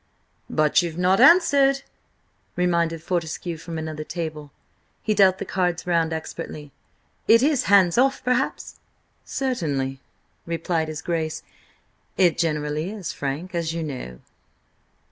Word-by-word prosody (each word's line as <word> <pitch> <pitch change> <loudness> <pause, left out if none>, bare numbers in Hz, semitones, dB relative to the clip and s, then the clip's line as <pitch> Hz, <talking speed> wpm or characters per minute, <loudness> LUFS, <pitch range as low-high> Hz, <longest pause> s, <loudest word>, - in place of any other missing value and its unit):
"But 155 -1 +3
you've 170 -2 -4
not 185 +2 +3
answered!" 275 -2 +5 0.7
reminded 170 -2 0
Fortescue 170 -1 -3
from 165 +1 -7
another 155 -1 -5
table. 155 -3 -5 0.5
He 215 - +1
dealt 190 -2 +5
the 200 - -5
cards 180 -2 -1
round 165 -2 +1
expertly. 160 -2 -6 0.6
"Is 230 +2 +6
it 285 -3 +3
hands 195 0 +5
off, 270 +1 +2
perhaps?" 250 +1 -1 0.5
"Certainly," 145 - -2 0.5
replied 165 -1 -1
his 155 0 -6
Grace. 160 -2 -2 0.7
"It 175 -4 +3
generally 150 0 -1
is, 205 -5 -5
Frank, 145 +7 -4
as 165 -2 -2
you 165 - -2
know." 125 - -6
170 Hz, 125 wpm, -23 LUFS, 155-190 Hz, 0.7 s, Is